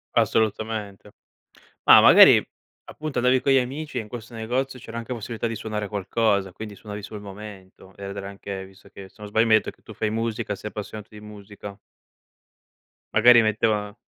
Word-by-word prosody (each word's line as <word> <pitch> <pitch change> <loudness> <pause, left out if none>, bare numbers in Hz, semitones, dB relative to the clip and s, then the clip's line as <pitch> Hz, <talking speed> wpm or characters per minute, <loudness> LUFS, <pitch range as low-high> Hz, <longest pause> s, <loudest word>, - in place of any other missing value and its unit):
Assolutamente. 110 -2 -1 0.7
Ma - - +8
magari - - +8 0.4
appunto 150 -4 -5
andavi 125 +1 +3
con 140 - +1
gli 135 - +5
amici 140 +4 -4
e - - -2
in 110 - -11
questo 120 +1 -9
negozio 125 +4 -3
c'era 115 0 -9
anche 115 +2 -5
possibilità 115 0 -5
di 115 - -4
suonare 105 -1 -4
qualcosa, 100 -1 0
quindi 105 +1 -8
suonavi 105 0 -8
sul 105 +1 -8
momento 95 -2 -12
ed 100 0 -7
era 100 -1 -6
anche 100 -1 -7
visto 95 0 -18
che, 100 -1 -11
se - - -31
non 105 - -8
sbaglio, 110 +2 +2
mi 110 - +4
hai 110 - +7
detto - - -7
che - - -33
tu - - -11
fai 110 - -2
musica, 110 -2 -3
sei 105 - -7
appassionato 105 0 -8
di 105 - -12
musica. 105 -1 -11 1.4
Magari 120 +2 +7
metteva 110 -1 0
110 Hz, 185 wpm, -24 LUFS, 100-115 Hz, 1.4 s, Ma